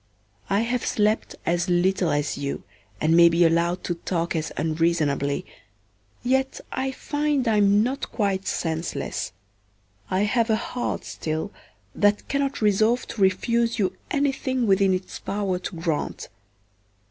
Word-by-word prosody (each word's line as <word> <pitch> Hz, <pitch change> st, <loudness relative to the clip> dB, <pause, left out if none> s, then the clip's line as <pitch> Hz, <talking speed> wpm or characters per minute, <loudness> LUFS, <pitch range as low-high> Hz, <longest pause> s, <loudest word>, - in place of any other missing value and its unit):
I 200 Hz, -, +2 dB
have 240 Hz, +1 st, -1 dB
slept 215 Hz, +1 st, +1 dB
as 175 Hz, +2 st, 0 dB
little 180 Hz, 0 st, +2 dB
as 145 Hz, 0 st, 0 dB
you, 140 Hz, 0 st, -4 dB, 0.4 s
and 160 Hz, +2 st, +3 dB
may 170 Hz, 0 st, +8 dB
be 170 Hz, +1 st, +4 dB
allowed 170 Hz, +2 st, +2 dB
to 175 Hz, -, -1 dB
talk 170 Hz, 0 st, -2 dB
as 160 Hz, -1 st, -2 dB
unreasonably, 155 Hz, -3 st, 0 dB, 0.8 s
yet 265 Hz, +1 st, +1 dB
I 265 Hz, +1 st, -1 dB
find 290 Hz, -1 st, -1 dB
I 220 Hz, -2 st, +3 dB
am 205 Hz, +1 st, +5 dB
not 260 Hz, +4 st, -3 dB
quite 195 Hz, -3 st, -1 dB
senseless; 160 Hz, 0 st, -2 dB, 0.8 s
I 185 Hz, -, +1 dB
have 225 Hz, +3 st, +2 dB
a 220 Hz, -, +4 dB
heart 240 Hz, +2 st, -3 dB
still 160 Hz, +5 st, -3 dB, 0.4 s
that 205 Hz, 0 st, +2 dB
cannot 275 Hz, -4 st, -1 dB
resolve 215 Hz, +4 st, +3 dB
to 215 Hz, -, -5 dB
refuse 230 Hz, +5 st, +2 dB
you 190 Hz, -4 st, 0 dB
anything 270 Hz, -3 st, 0 dB
within 195 Hz, -1 st, +4 dB
its 185 Hz, 0 st, -6 dB
power 195 Hz, -3 st, -2 dB
to 185 Hz, -, -6 dB
grant. 165 Hz, -2 st, -3 dB
195 Hz, 140 wpm, -24 LUFS, 170-235 Hz, 0.8 s, may